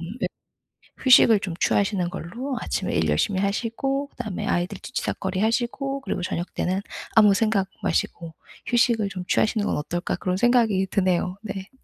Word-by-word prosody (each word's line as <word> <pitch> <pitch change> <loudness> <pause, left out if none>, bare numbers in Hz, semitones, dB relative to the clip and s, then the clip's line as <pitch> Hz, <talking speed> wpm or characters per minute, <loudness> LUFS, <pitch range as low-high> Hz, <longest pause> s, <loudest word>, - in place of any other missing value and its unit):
휴 185 +9 -4 0.8
휴식을 230 -4 +7
좀 185 -4 -4
취하시는 195 -3 +1
걸로 240 +9 -5
아침에 190 - -2
일 80 - +1
열심히 185 - +1
하시고 245 +7 -1
그다음에 215 -7 -5
아이들 180 +3 -1
뒤치다꺼리하시고 240 +6 -2
그리고 185 - -3
저녁때는 185 +2 -2 0.3
아무 210 -2 +7
생각 200 -2 +1 0.2
마시고 165 -2 -1 0.3
'휴식을 235 -3 +2
좀 185 -2 -6
취하시는 215 +2 +1
건 - - 0
어떨까?' 175 +4 -2
그런 180 0 -1
생각이 225 -5 +3
드네요. 185 -1 +1
네. 195 -3 -6
200 Hz, 360 characters per minute, -24 LUFS, 185-235 Hz, 0.8 s, 휴식을